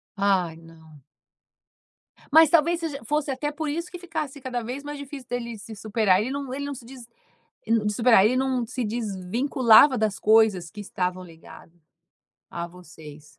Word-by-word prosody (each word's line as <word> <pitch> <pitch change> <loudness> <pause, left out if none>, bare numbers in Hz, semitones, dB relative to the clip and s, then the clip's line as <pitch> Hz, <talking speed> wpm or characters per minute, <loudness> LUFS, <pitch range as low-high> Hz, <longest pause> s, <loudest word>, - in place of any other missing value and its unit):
Ai 190 -5 +1
não. 160 -2 -17 1.3
Mas 320 0 +7
talvez 335 +1 +3
seja 305 -4 -5
fosse 295 +1 -1
até 295 +3 -3
por 310 +1 -5
isso 335 +4 -4
que 355 - -7
ficasse 315 -5 -5
cada 250 -2 -4
vez 255 +5 -6
mais 290 0 -6
difícil 280 -2 -9
dele 235 -2 -4
se 220 +2 -10
superar. 205 -2 +1
Ele 250 +5 -3
não 275 -2 -5
ele 285 +1 -4
não 285 -1 -5
se 240 - -12
dis 245 -1 -12 0.6
de 210 -2 +1
superar 225 -2 +5
ele 245 +4 +3
não 260 -2 0
se 255 +1 -4
desvinculava 230 +5 +3
das 215 -3 -1
coisas 215 -5 +3
que 210 - -10
estavam 185 -2 -3
ligadas 165 0 -15 0.8
a 170 0 -5
vocês. 160 -4 -14
235 Hz, 165 wpm, -25 LUFS, 190-280 Hz, 1.3 s, Mas